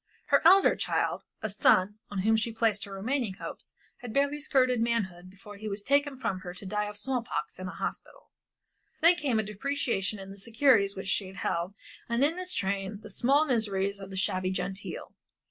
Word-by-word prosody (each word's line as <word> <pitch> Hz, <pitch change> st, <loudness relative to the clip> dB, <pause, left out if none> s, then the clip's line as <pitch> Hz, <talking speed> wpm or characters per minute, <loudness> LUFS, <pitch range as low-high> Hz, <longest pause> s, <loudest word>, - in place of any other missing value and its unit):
Her -, -, +5 dB
elder 380 Hz, +4 st, +7 dB
child, -, -, 0 dB, 0.2 s
a 220 Hz, -, -1 dB
son, 205 Hz, 0 st, +3 dB
on 200 Hz, -2 st, -2 dB
whom 220 Hz, +1 st, +4 dB
she 225 Hz, +1 st, 0 dB
placed 225 Hz, -2 st, +1 dB
her 200 Hz, -, -11 dB
remaining 215 Hz, +1 st, -2 dB
hopes, -, -, -8 dB, 0.2 s
had 245 Hz, -2 st, -8 dB
barely 285 Hz, +1 st, +1 dB
skirted 255 Hz, -5 st, +2 dB
manhood 190 Hz, -7 st, -1 dB
before 200 Hz, +2 st, -12 dB
he 215 Hz, +1 st, -5 dB
was 200 Hz, 0 st, -4 dB
taken 280 Hz, +2 st, +2 dB
from 195 Hz, -7 st, -2 dB
her 180 Hz, -1 st, -8 dB
to 195 Hz, -, -8 dB
die 210 Hz, +2 st, -1 dB
of 210 Hz, -, -8 dB
small 250 Hz, +3 st, -1 dB
pox 170 Hz, -10 st, -4 dB
in 185 Hz, -, -5 dB
a -, -, -5 dB
hospital. -, -, -6 dB, 0.7 s
Then 335 Hz, +2 st, +7 dB
came 280 Hz, -8 st, 0 dB
a 220 Hz, -, +2 dB
depreciation 215 Hz, -2 st, -2 dB
in 195 Hz, 0 st, -9 dB
the 200 Hz, -, -10 dB
securities 220 Hz, -2 st, +3 dB
which 190 Hz, 0 st, -6 dB
she 195 Hz, -1 st, 0 dB
held 180 Hz, 0 st, -2 dB, 0.3 s
and 235 Hz, +3 st, +2 dB
in 325 Hz, +5 st, -1 dB
its 365 Hz, 0 st, -1 dB
train 195 Hz, +1 st, -2 dB
the 215 Hz, -, -9 dB
small 275 Hz, +9 st, +3 dB
miseries 200 Hz, -6 st, 0 dB
of 195 Hz, -1 st, -8 dB
the 190 Hz, -, -7 dB
shabby 185 Hz, 0 st, 0 dB
genteel. 190 Hz, +1 st, -4 dB
210 Hz, 195 wpm, -29 LUFS, 195-255 Hz, 0.7 s, elder